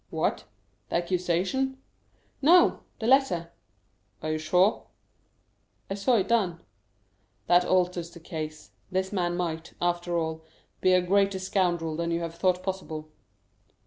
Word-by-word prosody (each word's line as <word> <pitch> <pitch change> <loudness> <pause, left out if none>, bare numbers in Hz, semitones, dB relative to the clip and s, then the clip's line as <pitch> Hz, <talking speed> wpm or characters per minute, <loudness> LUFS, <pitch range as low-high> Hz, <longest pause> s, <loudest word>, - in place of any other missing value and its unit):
"What? - - -1 0.4
the - - -2
accusation?" 180 +10 0 0.6
"No; 340 +5 +6 0.2
the 220 - -5
letter." 230 -10 +3 0.7
"Are 155 - -1
you 155 - -1
sure?" 180 +6 +2 1.0
"I - - +2
saw 200 +5 +2
it 195 -4 +1
done." 195 -8 +1 0.9
"That 175 0 +4
alters 180 -2 +1
the 170 0 -13
case. 155 -2 -7 0.2
This 190 +1 -1
man 175 -2 0
might, 165 -2 -3
after 175 0 0
all, 160 -1 -2 0.4
be 185 - +4
a 180 -1 +4
greater 195 +1 +2
scoundrel 175 -4 0
than 170 +1 -2
you 170 0 0
have 165 -1 -4
thought 180 +1 +1
possible." 160 -5 -5
180 Hz, 135 wpm, -27 LUFS, 170-190 Hz, 1.0 s, No